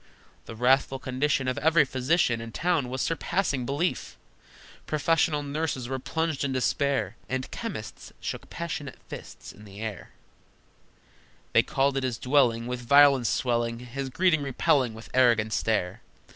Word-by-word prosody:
The 115 - -7
wrathful 130 +3 +2
condition 130 +1 -1
Of 130 - -1
every 160 -1 +4
physician 130 -2 +1
In 115 0 -7
town 165 -3 0
was 130 0 -2
surpassing 165 -6 -1
belief! 145 +6 -2 0.7
Professional 155 0 +1
nurses 145 -3 -3
were 130 +1 -3
plunged 160 +1 -2
in 140 - -1
despair, 130 - 0
And 130 0 -3
chemists 195 - -6
shook - - -6
passionate 165 -4 -5
fists - - -9
in 105 - -15
the 100 -1 -12
air: 110 -3 -6 1.4
They - - +7
called 135 0 0
at - - 0
his 125 -3 -1
dwelling, 125 -4 +2
With 125 0 -4
violence 140 -1 +5
swelling, 120 -2 0
His 130 +3 -6
greeting 170 +2 +2
repelling 130 -3 +1
with 110 - -12
arrogant 115 -4 +3
stare. 100 -5 -1
130 Hz, 145 wpm, -27 LUFS, 120-145 Hz, 1.4 s, They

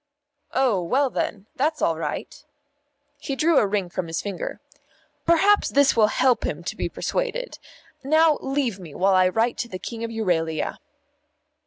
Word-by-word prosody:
"Oh, 250 -8 +2
well, 260 +10 +1
then, 200 -2 -3
that's 305 +3 0
all 165 - +1
right." 160 - -5 0.8
He 275 - -4
drew 315 +2 +4
a 205 - +2
ring 195 -2 -1
from 175 0 -4
his 165 +1 -3
finger. 200 -3 -5 0.7
"Perhaps 390 +5 +4
this 280 0 +4
will 220 -2 +5
help 250 +3 +2
him - - -3
to - - -4
be - - -3
persuaded. - - -3 0.4
Now 315 +2 +4
leave 270 -7 -1
me 165 -6 -11
while 195 +1 +3
I 185 0 +5
write 225 +5 0
to 240 - -2
the 185 - -6
King 230 +4 -6
of 230 - -3
Euralia." 170 -8 -1
230 Hz, 165 wpm, -24 LUFS, 185-285 Hz, 0.8 s, will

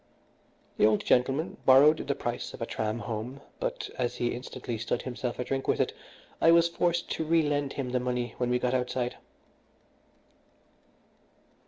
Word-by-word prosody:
The - - +5
old 110 -1 +1
gentleman 135 +5 +2
borrowed 140 +4 +7
the 140 - 0
price 120 0 -4
of - - -14
a - - -1
tram 110 -1 -2
home; 120 +4 -5 0.2
but - - -3
as 125 -1 0
he 120 -1 0
instantly 125 -2 -6
stood 120 +1 -2
himself 125 -1 -4
a - - -2
drink 135 +1 -3
with - - +2
it, - - +1 0.5
I 165 - +6
was 170 0 +6
forced 170 0 0
to - - -1
relend 145 -3 +1
him 130 -3 -3
the 125 - +1
money 125 -1 -2
when 125 -1 0
we 125 - +3
got 125 0 0
outside. 125 -1 -1
125 Hz, 165 wpm, -29 LUFS, 120-145 Hz, 0.5 s, borrowed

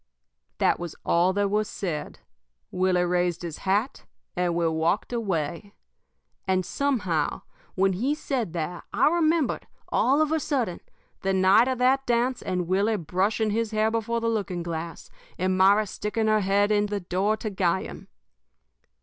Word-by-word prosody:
_' - - -49
"That - - +2
was 175 -2 -6
all 175 +2 +3
that 200 0 0
was 210 0 0
said. 170 -6 -5 0.5
Willie 185 -1 +2
raised 175 -1 0
his 165 -3 -6
hat, 210 +7 0 0.3
and 175 -1 0
we 170 -1 +1
walked 165 +8 0
away. 195 -3 -3 0.7
"And, 185 -1 +1
somehow, 185 - -1 0.3
when 190 0 +2
he 255 +11 0
said 250 - -3
that, 170 +1 -4
I - - +3
remembered, 325 -3 +1 0.2
all 275 +4 +2
of 310 -1 +2
a 320 - +2
sudden, 255 - -1 0.4
the 195 0 0
night 190 +5 +5
of 260 -1 -1
that 265 +2 +2
dance 245 +1 +1
and 180 -2 -2
Willie 200 +4 +1
brushing 195 +6 0
his 225 +1 0
hair 215 0 +1
before 230 +1 -1
the 230 - -2
looking 200 -6 -2
glass, 165 -1 -6 0.3
and 185 +1 0
Myra 200 +3 +5
sticking 210 +2 -3
her 215 0 +3
head 200 +2 +2
in 210 0 +2
the 205 0 -2
door 195 +4 0
to 215 0 -4
guy 185 -1 +1
him. - - -10
200 Hz, 165 wpm, -26 LUFS, 180-230 Hz, 0.7 s, night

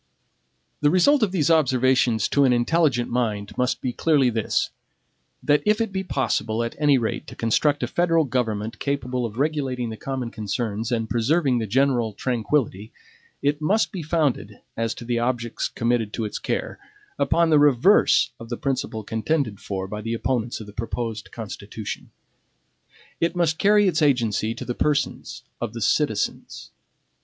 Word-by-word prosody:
The 145 - +3
result 265 - +4
of 210 -4 +2
these 165 -4 +1
observations 130 -6 +3
to 140 - +3
an 130 - +4
intelligent 125 0 +1
mind 110 -4 -2
must 125 0 0
be 125 - -2
clearly 140 -5 +3
this, 110 -2 0 0.7
that 145 0 +3
if 210 +1 +2
it 225 -3 -1
be 190 0 -2
possible 115 - -1
at 115 - -4
any 145 -2 +4
rate 115 -3 -3
to - - -10
construct 145 +6 +1
a - - 0
federal 165 -2 +2
government 115 -4 -2
capable 125 -3 -2
of 110 0 -11
regulating 135 -5 -1
the 110 - -7
common 130 -2 -4
concerns 110 +1 -3
and 115 -2 0
preserving 130 +3 +1
the 110 - -3
general 120 -1 +1
tranquillity, 115 -3 -1 0.5
it 145 +2 +1
must 205 +8 +2
be 185 - -5
founded, 155 -3 -1 0.2
as 115 0 -2
to 120 - -9
the 120 0 0
objects 120 -1 -1
committed 115 -2 -1
to 115 - -2
its 105 - -4
care, - - -3 0.4
upon 170 -1 +2
the 150 - +6
reverse 145 - +4
of 115 - -10
the 120 - -3
principle 130 -5 -2
contended 110 0 -1
for 95 -1 -4
by 105 +2 -5
the 115 +2 -2
opponents 120 -1 -2
of 110 - -8
the 105 - -12
proposed 115 0 -4
Constitution. 105 -1 -7 1.1
It 170 +1 0
must 165 -3 +1
carry 205 0 +4
its 165 -4 +1
agency 115 -6 +1
to - - -7
the 125 - -2
persons 145 +2 -1 0.2
of - - -3
the - - -6
citizens. - - -1
125 Hz, 165 wpm, -23 LUFS, 115-150 Hz, 1.1 s, the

